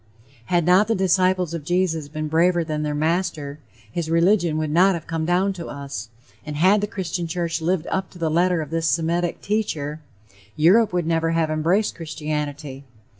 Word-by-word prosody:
Had 175 Hz, +2 st, +1 dB
not 185 Hz, +4 st, +5 dB
the 225 Hz, -, +1 dB
disciples 185 Hz, -2 st, +2 dB
of 165 Hz, -3 st, -4 dB
Jesus 170 Hz, -2 st, 0 dB
been 155 Hz, +1 st, -4 dB
braver 170 Hz, +2 st, +2 dB
than 155 Hz, -2 st, -3 dB
their 150 Hz, -1 st, -2 dB
master, 155 Hz, -2 st, -1 dB, 0.3 s
his 165 Hz, +4 st, -3 dB
religion 170 Hz, -1 st, +3 dB
would 155 Hz, -1 st, -2 dB
not 185 Hz, +4 st, +4 dB
have 165 Hz, -, -7 dB
come 165 Hz, -1 st, -2 dB
down 185 Hz, +3 st, +2 dB
to 175 Hz, -3 st, -7 dB
us. 140 Hz, -4 st, -6 dB, 0.3 s
And 150 Hz, -1 st, -6 dB
had 190 Hz, +7 st, +4 dB
the 210 Hz, -, -1 dB
Christian 180 Hz, -4 st, -4 dB
church 165 Hz, -1 st, -2 dB
lived 170 Hz, 0 st, 0 dB
up 190 Hz, -1 st, -1 dB
to -, -, -15 dB
the 165 Hz, -2 st, -1 dB
letter 175 Hz, +1 st, +2 dB
of 150 Hz, -, -11 dB
this 165 Hz, 0 st, 0 dB
Semitic 170 Hz, +1 st, 0 dB
teacher, 160 Hz, -8 st, -2 dB, 0.6 s
Europe 200 Hz, +8 st, +4 dB
would 175 Hz, -2 st, -1 dB
never 165 Hz, 0 st, +1 dB
have 160 Hz, -1 st, +1 dB
embraced 170 Hz, +7 st, +1 dB
Christianity. 150 Hz, -3 st, -5 dB
165 Hz, 180 wpm, -22 LUFS, 155-180 Hz, 0.6 s, not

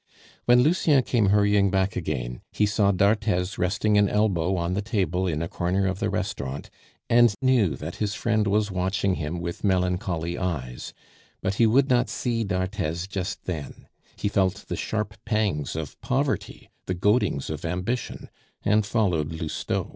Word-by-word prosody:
When 120 Hz, 0 st, +6 dB
Lucien 150 Hz, -3 st, +3 dB
came 115 Hz, -4 st, +2 dB
hurrying 100 Hz, 0 st, +4 dB
back 95 Hz, 0 st, 0 dB
again, 65 Hz, -8 st, -3 dB
he 105 Hz, -, +2 dB
saw 100 Hz, -1 st, +2 dB
d'Arthez 100 Hz, -1 st, +1 dB
resting 105 Hz, +3 st, +2 dB
an 100 Hz, -1 st, +3 dB
elbow 95 Hz, -4 st, +1 dB
on 85 Hz, 0 st, -1 dB
the 100 Hz, -, 0 dB
table 95 Hz, -4 st, 0 dB
in 80 Hz, -2 st, -1 dB
a -, -, -2 dB
corner 90 Hz, +3 st, 0 dB
of 95 Hz, 0 st, -1 dB
the 110 Hz, -, 0 dB
restaurant, 95 Hz, -10 st, -4 dB, 0.4 s
and 120 Hz, -3 st, +5 dB
knew 125 Hz, -, +3 dB
that 75 Hz, +5 st, -7 dB
his 105 Hz, -1 st, -1 dB
friend 110 Hz, -3 st, +1 dB
was 105 Hz, 0 st, +1 dB
watching 95 Hz, +1 st, 0 dB
him 85 Hz, 0 st, -3 dB
with 85 Hz, 0 st, -5 dB
melancholy 90 Hz, -3 st, 0 dB
eyes, 70 Hz, -10 st, -4 dB, 0.5 s
but 95 Hz, -, 0 dB
he 115 Hz, -, +6 dB
would 130 Hz, +5 st, +4 dB
not 125 Hz, -2 st, +2 dB
see 115 Hz, -2 st, -1 dB
d'Arthez 95 Hz, -3 st, -2 dB
just 100 Hz, 0 st, -4 dB
then; 80 Hz, -6 st, -6 dB, 0.3 s
he -, -, -2 dB
felt 100 Hz, -1 st, 0 dB
the -, -, -3 dB
sharp 105 Hz, -1 st, -3 dB
pangs 105 Hz, -11 st, -1 dB
of 80 Hz, -3 st, -6 dB
poverty, -, -, -2 dB, 0.2 s
the 90 Hz, -, -1 dB
goadings 100 Hz, -, +1 dB
of 75 Hz, -1 st, -5 dB
ambition, 90 Hz, +8 st, -3 dB, 0.4 s
and 105 Hz, 0 st, +2 dB
followed 90 Hz, -9 st, +1 dB
Lousteau. 80 Hz, -1 st, -3 dB
95 Hz, 160 wpm, -25 LUFS, 85-105 Hz, 0.5 s, When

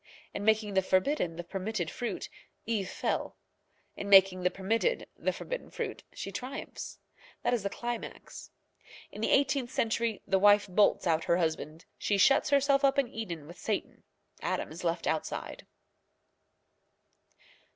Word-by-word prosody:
In 200 Hz, -, -4 dB
making 215 Hz, -1 st, +2 dB
the 190 Hz, -, +4 dB
forbidden 185 Hz, -, +1 dB
the 175 Hz, -, -5 dB
permitted 190 Hz, 0 st, -3 dB
fruit, 245 Hz, -, -4 dB, 0.4 s
Eve 210 Hz, -5 st, -1 dB
fell; -, -, -2 dB, 0.6 s
in 200 Hz, -, -5 dB
making 190 Hz, -2 st, +7 dB
the 180 Hz, -, +3 dB
permitted 225 Hz, -, 0 dB
the -, -, 0 dB
forbidden -, -, -6 dB
fruit, -, -, -4 dB
she 195 Hz, -, -6 dB
triumphs. 255 Hz, +8 st, -6 dB, 0.5 s
That -, -, +2 dB
is 240 Hz, -, +1 dB
the 200 Hz, -, -2 dB
climax. 240 Hz, +2 st, -6 dB, 0.6 s
In -, -, -8 dB
the -, -, +1 dB
eighteenth 270 Hz, -2 st, +2 dB
century 230 Hz, -2 st, -1 dB
the 190 Hz, 0 st, +2 dB
wife 205 Hz, +1 st, +6 dB
bolts 200 Hz, +2 st, +3 dB
out 165 Hz, -1 st, +2 dB
her 170 Hz, -, +3 dB
husband. 160 Hz, -1 st, -2 dB
She 205 Hz, -, +1 dB
shuts 270 Hz, +8 st, +5 dB
herself 280 Hz, 0 st, +3 dB
up 275 Hz, 0 st, +4 dB
in 275 Hz, -3 st, +2 dB
Eden 175 Hz, -11 st, -5 dB
with 170 Hz, +4 st, -12 dB
Satan. 215 Hz, -2 st, -3 dB, 0.4 s
Adam -, -, -2 dB
is -, -, -8 dB
left -, -, -1 dB
outside. -, -, -3 dB
205 Hz, 150 wpm, -30 LUFS, 185-240 Hz, 0.6 s, making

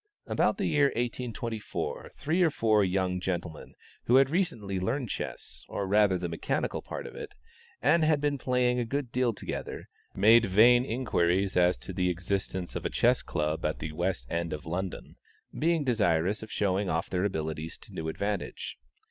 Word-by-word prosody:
About -, -, +1 dB
the -, -, -1 dB
year 145 Hz, -1 st, +3 dB
1824, 115 Hz, -2 st, -3 dB
three 165 Hz, +5 st, 0 dB
or 170 Hz, -, +5 dB
four 110 Hz, -7 st, +3 dB
young 90 Hz, -1 st, 0 dB
gentlemen 85 Hz, -3 st, -4 dB, 0.3 s
who 120 Hz, -, +4 dB
had 135 Hz, +1 st, +5 dB
recently 115 Hz, -, -1 dB
learned 115 Hz, +5 st, -1 dB
chess, -, -, -5 dB
or 100 Hz, -, -2 dB
rather 100 Hz, -1 st, +4 dB
the 90 Hz, 0 st, -3 dB
mechanical 85 Hz, -1 st, -2 dB
part -, -, -6 dB
of -, -, -8 dB
it, -, -, -8 dB, 0.5 s
and 155 Hz, +5 st, +4 dB
had 155 Hz, -1 st, +3 dB
been 145 Hz, -1 st, 0 dB
playing 125 Hz, -1 st, +1 dB
a -, -, +1 dB
good 130 Hz, +1 st, -3 dB
deal 125 Hz, -1 st, +2 dB
together, 110 Hz, -, -6 dB, 0.3 s
made 115 Hz, +2 st, +6 dB
vain 120 Hz, +6 st, +6 dB
inquiries 100 Hz, -6 st, +1 dB
as 90 Hz, -5 st, +4 dB
to -, -, -8 dB
the 90 Hz, -1 st, +1 dB
existence 90 Hz, 0 st, -3 dB
of -, -, -3 dB
a -, -, -1 dB
Chess -, -, +3 dB
Club 75 Hz, +1 st, -2 dB
at 75 Hz, +1 st, 0 dB
the 75 Hz, -, -5 dB
West 85 Hz, -5 st, -2 dB
End 85 Hz, +4 st, -2 dB
of 75 Hz, -, -6 dB
London, 90 Hz, +3 st, -5 dB, 0.4 s
being 165 Hz, 0 st, +1 dB
desirous 100 Hz, -, +1 dB
of 110 Hz, -, -9 dB
showing 100 Hz, -1 st, 0 dB
off 80 Hz, 0 st, 0 dB
their 90 Hz, 0 st, -1 dB
abilities 80 Hz, -4 st, -3 dB
to -, -, -14 dB
new 80 Hz, -, -4 dB
advantage. 100 Hz, +3 st, -4 dB
100 Hz, 175 wpm, -29 LUFS, 90-125 Hz, 0.5 s, made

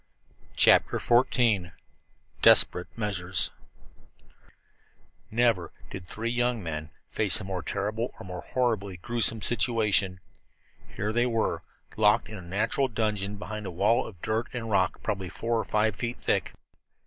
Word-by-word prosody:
CHAPTER -, -, +5 dB
XIV 115 Hz, -7 st, +2 dB, 0.7 s
DESPERATE 90 Hz, -, +5 dB
MEASURES 95 Hz, -5 st, -1 dB, 1.8 s
Never 115 Hz, -6 st, +1 dB, 0.2 s
did 95 Hz, -2 st, -8 dB
three 115 Hz, +4 st, -3 dB
young 120 Hz, -2 st, 0 dB
men 75 Hz, -2 st, -5 dB, 0.2 s
face 105 Hz, -3 st, +2 dB
a -, -, -6 dB
more 95 Hz, -2 st, -4 dB
terrible 105 Hz, +7 st, -2 dB
or -, -, -9 dB
more 90 Hz, -1 st, -6 dB
horribly 110 Hz, -7 st, -1 dB
gruesome 115 Hz, +2 st, 0 dB
situation. 105 Hz, -5 st, +2 dB, 0.8 s
Here 105 Hz, +1 st, -2 dB
they 120 Hz, +2 st, +2 dB
were, 115 Hz, -2 st, 0 dB, 0.4 s
locked 110 Hz, +1 st, +3 dB
in 110 Hz, -, -7 dB
a -, -, -9 dB
natural 105 Hz, +9 st, 0 dB
dungeon 105 Hz, -4 st, -2 dB
behind 105 Hz, 0 st, -6 dB
a -, -, -3 dB
wall 100 Hz, +7 st, +2 dB
of 95 Hz, -6 st, -12 dB
dirt 110 Hz, +2 st, -1 dB
and 115 Hz, -3 st, -4 dB
rock 95 Hz, -2 st, +1 dB
probably 95 Hz, -4 st, -2 dB
four 115 Hz, +4 st, -1 dB
or -, -, -1 dB
five 105 Hz, -1 st, +1 dB
feet 115 Hz, +5 st, -3 dB
thick. -, -, 0 dB
105 Hz, 135 wpm, -27 LUFS, 95-115 Hz, 1.8 s, CHAPTER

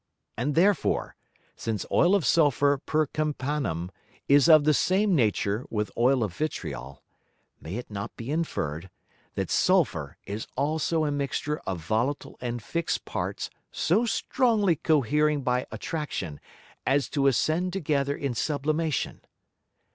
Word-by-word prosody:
And 135 Hz, +6 st, -1 dB
therefore, 195 Hz, +4 st, +2 dB, 0.4 s
since 110 Hz, -3 st, -3 dB
Oil 180 Hz, +3 st, +4 dB
of 195 Hz, -, +1 dB
Sulphur 145 Hz, -3 st, +3 dB
per 155 Hz, 0 st, +1 dB
Campanam 135 Hz, -, -2 dB, 0.4 s
is 140 Hz, +3 st, +5 dB
of 155 Hz, -2 st, +8 dB
the 155 Hz, +1 st, +4 dB
same 190 Hz, +6 st, +2 dB
Nature 105 Hz, -3 st, +1 dB
with 105 Hz, -1 st, -2 dB
Oil 125 Hz, +1 st, +3 dB
of 95 Hz, -5 st, -4 dB
Vitriol, 70 Hz, -, -5 dB, 0.6 s
may 80 Hz, +5 st, -7 dB
it 120 Hz, -1 st, -6 dB
not 100 Hz, 0 st, -5 dB
be 120 Hz, +4 st, -5 dB
inferred, 95 Hz, -, -2 dB, 0.5 s
that -, -, -2 dB
Sulphur -, -, +2 dB
is 105 Hz, +2 st, -5 dB
also 155 Hz, +2 st, +1 dB
a 145 Hz, -, 0 dB
mixture 145 Hz, +1 st, -2 dB
of 95 Hz, -3 st, -3 dB
volatile 120 Hz, -, -1 dB
and 120 Hz, -2 st, -4 dB
fix'd 170 Hz, +6 st, -2 dB
Parts -, -, -4 dB, 0.2 s
so 215 Hz, +9 st, +1 dB
strongly 220 Hz, -7 st, +2 dB
cohering 150 Hz, -1 st, +2 dB
by 125 Hz, 0 st, 0 dB
Attraction, 145 Hz, -, -4 dB, 0.4 s
as 135 Hz, -2 st, +2 dB
to 140 Hz, -2 st, +1 dB
ascend 160 Hz, +7 st, +1 dB
together 145 Hz, -6 st, 0 dB
in 140 Hz, -3 st, -2 dB
Sublimation. 150 Hz, +3 st, -1 dB
145 Hz, 130 wpm, -27 LUFS, 115-155 Hz, 0.6 s, of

